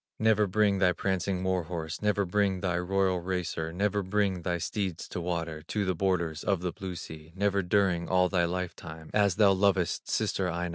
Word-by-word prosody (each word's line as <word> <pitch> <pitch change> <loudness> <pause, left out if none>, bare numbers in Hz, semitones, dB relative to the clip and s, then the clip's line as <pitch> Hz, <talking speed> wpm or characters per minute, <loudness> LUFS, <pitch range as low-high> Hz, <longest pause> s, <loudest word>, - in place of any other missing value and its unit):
Never 110 -1 +3
bring 100 0 +2
thy 90 -2 +4
prancing 95 0 -1
war 95 -2 0
horse, 80 -1 -5
Never 105 -1 +1
bring 95 0 +1
thy 90 -2 0
royal 95 0 +1
racer, 85 -2 -3
Never 105 +3 0
bring 95 -1 0
thy 90 0 -1
steeds 95 -1 -3
to 90 - -4
water, 85 -3 -3
To 105 +5 -2
the 95 - +1
borders 85 -4 -1
of 100 -4 +1
the 90 -1 -2
blue 95 +1 -6
sea, 80 -1 -9
Never 100 0 +1
during 90 -2 +1
all 90 0 +4
thy 90 -2 +1
life 90 +1 -3
time, 80 -1 -10
As 100 -3 +3
thou 105 -2 +5
lovest 95 -3 +1
sister 95 -2 0
Aino. 85 +1 -2
90 Hz, 195 wpm, -29 LUFS, 85-100 Hz, -, thou